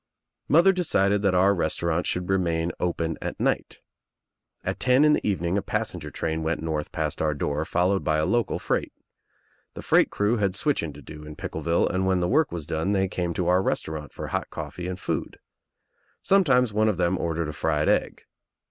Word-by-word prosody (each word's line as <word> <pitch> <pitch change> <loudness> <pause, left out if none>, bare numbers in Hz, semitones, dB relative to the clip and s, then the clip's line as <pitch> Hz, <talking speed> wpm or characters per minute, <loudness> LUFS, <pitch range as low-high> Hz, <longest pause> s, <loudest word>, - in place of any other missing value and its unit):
Mother 175 +5 +5
decided 105 - +1
that 100 -3 +2
our 95 +2 +4
restaurant 85 -1 -1
should 90 0 -2
remain 85 -3 0
open 85 -2 -2
at - - -5
night. - - -1 0.8
At - - -3
ten 130 +3 +4
in 150 - +5
the - - 0
evening 95 -1 0
a - - -4
passenger 95 -7 -3
train 80 +1 -3
went 80 +1 -1
north 75 -2 -3
past 80 -4 -3
our 75 -1 +1
door 75 +2 -2
followed 90 +4 +1
by 80 -1 +1
a 75 - +1
local 120 +4 0
freight. - - -2 0.8
The - - -7
freight - - +4
crew 105 +4 +1
had 100 -3 0
switching 100 - 0
to 75 0 -13
do 75 +3 -10
in 75 0 -9
Pickleville 85 +2 -1
and 95 +1 -1
when 95 -1 +2
the 90 - 0
work 150 - +2
was 85 -4 -5
done 80 +5 -1
they 95 -1 +2
came 90 -2 -3
to 90 - -1
our 90 +1 +4
restaurant 80 -6 -3
for - - -7
hot - - -2
coffee 90 0 -6
and 90 0 -5
food. - - -3 0.9
Some 195 0 +4
times 125 - +3
one 110 +1 +3
of 100 - -1
them 90 +1 +1
ordered 85 -1 -2
a - - -5
fried 75 +1 0
egg. - - 0
90 Hz, 200 wpm, -25 LUFS, 80-100 Hz, 0.9 s, Mother